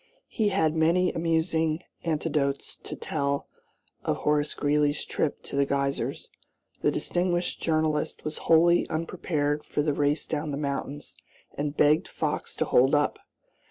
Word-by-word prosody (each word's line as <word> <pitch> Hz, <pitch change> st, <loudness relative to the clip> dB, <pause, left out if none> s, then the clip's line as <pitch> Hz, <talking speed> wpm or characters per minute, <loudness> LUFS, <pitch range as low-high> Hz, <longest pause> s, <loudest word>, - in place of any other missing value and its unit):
He 215 Hz, -2 st, +1 dB
had 160 Hz, -5 st, +1 dB
many 170 Hz, +3 st, +3 dB
amusing 160 Hz, 0 st, +1 dB, 0.2 s
anecdotes 150 Hz, -4 st, -1 dB
to -, -, -8 dB
tell 140 Hz, -2 st, -2 dB, 0.6 s
of -, -, 0 dB
Horace 150 Hz, 0 st, +1 dB
Greeley's 145 Hz, 0 st, +1 dB
trip 150 Hz, -, -2 dB
to -, -, -7 dB
the 140 Hz, -, +4 dB
Geysers. 140 Hz, 0 st, -1 dB, 0.5 s
The -, -, +3 dB
distinguished 175 Hz, 0 st, -1 dB
journalist 155 Hz, -2 st, 0 dB
was 155 Hz, 0 st, -4 dB
wholly 170 Hz, +1 st, +5 dB
unprepared 155 Hz, -3 st, -1 dB
for 145 Hz, -, -1 dB
the 150 Hz, -1 st, +1 dB
race 145 Hz, +2 st, +1 dB
down 155 Hz, 0 st, -3 dB
the 140 Hz, -, -2 dB
mountains 140 Hz, 0 st, -4 dB, 0.4 s
and 145 Hz, 0 st, -3 dB
begged 150 Hz, +1 st, +4 dB
Fox -, -, -3 dB
to -, -, 0 dB
hold 135 Hz, +4 st, +4 dB
up. 145 Hz, 0 st, +1 dB
150 Hz, 140 wpm, -27 LUFS, 145-165 Hz, 0.6 s, wholly